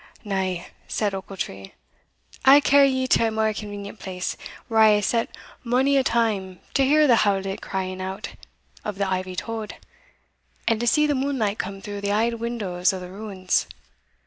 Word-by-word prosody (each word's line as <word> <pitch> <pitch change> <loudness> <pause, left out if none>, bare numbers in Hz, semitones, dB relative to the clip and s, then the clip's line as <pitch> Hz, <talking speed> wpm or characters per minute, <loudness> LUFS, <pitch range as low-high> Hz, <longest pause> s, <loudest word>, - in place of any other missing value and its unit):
"Now," 190 -4 -2 0.2
said 205 -2 -1
Ochiltree, 185 - -6 0.7
"I 270 - +9
will 290 - +6
carry 280 -1 +5
ye 260 -1 0
to 230 -3 +3
a - - +1
mair 220 0 0
convenient 205 0 -7
place, 185 -1 -4 0.3
where 225 -2 +1
I 215 -1 +7
hae 210 - +1
sat 230 +3 0 0.3
mony 260 +3 +2
a 270 - +4
time 205 -7 0
to 275 - +3
hear 300 +3 +5
the 245 -5 +5
howlit 195 -2 0
crying 185 -1 -4
out 190 +2 -5 0.5
of 210 -2 -4
the 200 -1 0
ivy 185 -1 -2
tod, 220 +2 -5 0.9
and 225 -1 +2
to 240 - -1
see 300 +5 +4
the 295 - +2
moonlight 260 -7 -1
come 195 +1 -4
through 205 -1 -6
the 200 0 -1
auld 230 +2 +1
windows 205 -6 0
o' 190 - -4
the 180 0 -8
ruins. 195 -2 -1
210 Hz, 175 wpm, -24 LUFS, 190-235 Hz, 0.9 s, I